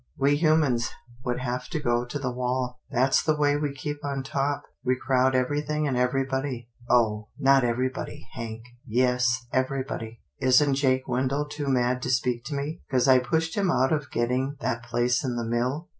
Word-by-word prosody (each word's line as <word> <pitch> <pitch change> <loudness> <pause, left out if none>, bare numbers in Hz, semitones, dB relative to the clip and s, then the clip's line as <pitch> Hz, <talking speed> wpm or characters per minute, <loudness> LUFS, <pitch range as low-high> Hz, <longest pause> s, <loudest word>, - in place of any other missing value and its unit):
We 140 +1 +3
humans 150 -6 +2 0.3
would 125 -2 -1
have 125 0 -3
to 155 - -3
go 120 -3 +1
to 125 +4 -4
the 130 -3 -2
wall. 125 0 -2
That's 135 0 +3
the 155 - +1
way 145 -1 +2
we 145 -1 -1
keep 145 +2 -5
on 140 -2 -2
top. 140 +1 -1 0.2
We 130 -1 +2
crowd 130 0 +2
everything 150 +3 0
and 135 - 0
everybody." 130 -1 -1
" 120 - -21
Oh! 110 -3 +2
not 135 -2 +4
everybody, 125 0 -2
Hank." 115 -1 -6 0.2
" - - -31
Yes, 125 0 +2
everybody. 130 -4 -2 0.2
Isn't 135 +2 +4
Jake 130 -1 +1
Wendell 135 +3 0
too 145 -1 -4
mad 125 -1 +1
to - - -3
speak 125 -1 0
to 145 - -4
me, 145 +4 -4
'cause 130 -1 +2
I 130 -1 +7
pushed 160 +6 -1
him 200 -3 +1
out 135 -2 +2
of 150 -2 -2
getting 125 +4 0
that 120 -3 -2
place 120 +1 0
in 125 -3 -2
the 120 -1 -2
mill? 125 +8 -1
130 Hz, 190 wpm, -26 LUFS, 125-140 Hz, 0.3 s, I